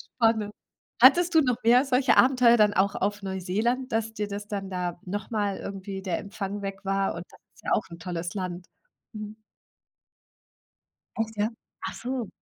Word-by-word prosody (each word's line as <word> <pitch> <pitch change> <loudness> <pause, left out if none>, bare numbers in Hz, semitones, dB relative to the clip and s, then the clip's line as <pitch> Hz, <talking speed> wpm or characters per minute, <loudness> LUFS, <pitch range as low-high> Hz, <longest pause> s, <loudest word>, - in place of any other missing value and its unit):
spannend. 220 -3 +2 0.5
Hattest 335 +7 +7
du 315 - +8
noch 250 -4 +1
mehr 245 +3 +6
solche 255 0 +3
Abenteuer 250 -2 +6
dann 210 -1 +4
auch 195 +1 +2
auf 205 +1 -1
Neuseeland, 215 +8 -1
dass 225 0 -1
dir 210 -1 -3
das 205 +1 -5
dann 200 -2 -4
da 180 -2 -3
noch 205 +3 -5
mal 205 -3 0
irgendwie 195 0 -6
der 185 -3 -2
Empfang 200 0 -5
weg 195 -1 -5
war 195 0 +1
und 170 +1 -7
das - - -18 0.2
ist - - -20
ja - - -2
auch 210 - +2
'n 170 - -9
tolles 170 0 -4
Land, 180 -2 -4 0.5
mhm? 215 0 -7 1.8
Echt, 225 0 -2
ja? 210 +2 +1 0.4
Achso. 245 -1 -4
205 Hz, 170 wpm, -27 LUFS, 195-230 Hz, 1.8 s, du